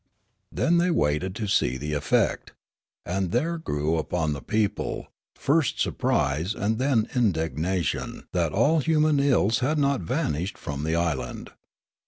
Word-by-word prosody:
Then 170 +1 +2
the)' 175 +1 +2
waited 75 - 0
to 110 -2 -3
see 65 -9 +1
the 75 +3 -4
effect; 75 0 0 0.5
and 95 0 -1
there 165 - 0
grew 75 - -1
upon 80 0 -1
the 70 - -6
people, 105 -2 -2 0.3
first 145 -1 +1
surprise, 75 +9 0
and 110 +2 -1
then 130 -5 +2
indignation 85 - -1
that 85 -3 +1
all 145 +11 +3
human 155 -1 +2
ills 125 -6 +3
had 140 +5 0
not 140 -5 +1
vanished 80 +2 -2
from 70 0 -5
the 80 +1 0
island. 75 -8 -2
95 Hz, 140 wpm, -25 LUFS, -, 0.5 s, all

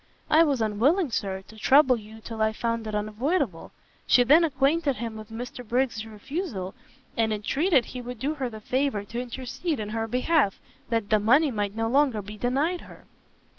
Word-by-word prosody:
"I 315 - +7
was 280 -8 +2
unwilling, 260 - +2
Sir, 190 -3 -2
to 220 - -14
trouble 265 +3 +5
you 220 0 -11
till 225 0 -6
I 220 0 +2
found 230 0 -2
it 215 - -3
unavoidable." 215 - -1 0.4
She 245 - +6
then 300 +7 +6
acquainted 285 0 +1
him 230 -1 -5
with 215 0 -9
Mr 245 +2 -7
Briggs' 235 -1 -1
refusal, 215 - -5 0.4
and 225 -1 +1
entreated 265 - +2
he 250 - -7
would 245 0 -7
do 280 +6 -1
her 270 -5 -3
the 220 -2 -10
favour 255 -3 0
to 235 +4 -5
intercede 260 +5 -4
in 210 -1 -4
her 225 +1 -2
behalf, 255 -1 +1 0.3
that 225 -3 -1
the 215 - +5
money 270 +8 +4
might 205 -2 -2
no 225 0 0
longer 255 -4 +2
be 210 +2 -8
denied 275 - 0
her. - - -14
235 Hz, 185 wpm, -26 LUFS, 215-275 Hz, 0.4 s, I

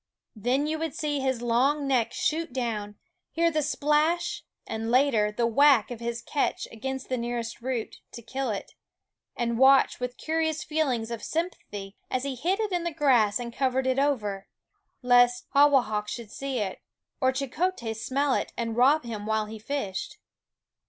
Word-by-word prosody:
Then 250 +7 0
you 310 +1 -2
would 325 -2 -3
see 295 -2 -1
his 260 -3 -1
long 270 +5 +2
neck 240 -4 +2
shoot 320 -1 -1
down, 220 -5 -3 0.3
hear 335 +1 +1
the 310 -1 +1
splash 315 +4 +1 0.2
and, 225 +1 -4
later, 240 -5 +3
the 235 +3 0
whack 255 0 +4
of 240 - -6
his 235 0 -4
catch 285 - -1
against 265 +4 -5
the 255 -1 -1
nearest 235 -1 -4
root, 245 -2 -3 0.2
to 235 - -9
kill 260 +3 -3
it; 205 -3 -4 0.6
and 235 -1 -1
watch 270 +1 +5
with 250 0 -4
curious 315 -1 -1
feelings 270 -8 -1
of 230 -2 -4
sympathy 210 - -4
as 255 0 -1
he 275 -1 -2
hid 345 - -1
it 430 -2 -1
in 350 -2 0
the 340 - -1
grass 250 -9 +3
and 235 -1 -6
covered 265 0 0
it 260 +1 +1
over, 210 -9 0 0.6
lest 245 0 +4
Hawahak 260 -7 +4
should 220 0 -6
see, 260 -7 -2 0.5
or 260 0 +4
Cheokhes 265 -4 -2
smell 275 +1 +1
it, - - -2
and 230 -1 -2
rob 270 +5 +4
him 215 -3 -6
while 220 0 +1
he 220 +1 -8
fished. 215 - -4
255 Hz, 165 wpm, -27 LUFS, 230-290 Hz, 0.6 s, watch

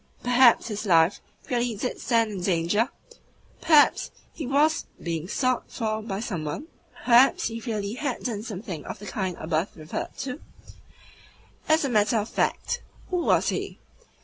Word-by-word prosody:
Perhaps 245 -1 +5
his 210 0 -4
life 165 +1 +4 0.3
really 240 -2 0
DID 250 +5 -3
stand 230 -2 +2
in 195 -3 -5
danger? 180 +6 +1 0.7
Perhaps 305 -3 +5 0.2
he 305 - -5
really 270 - -2
WAS 310 +2 +2
being 165 -1 -3
sought 255 +4 0
for 220 -2 -2
by 200 -3 -4
some 195 -8 -3
one? 150 - -4 0.4
Perhaps 245 0 +5
he 230 0 -5
really 215 -3 -3
HAD 255 +1 -3
done 220 -5 -2
something 195 -7 -6
of - - -6
the 205 - -11
kind 190 -3 -3
above 160 +4 -2
referred 155 0 -6
to? 275 +3 -5 1.3
As 315 -1 +4
a - - -1
matter 215 0 +3
of 215 +1 -2
fact, 485 - -1 0.3
who 365 - +1
was 345 - +2
he? - - -3
220 Hz, 160 wpm, -26 LUFS, 190-250 Hz, 1.3 s, Perhaps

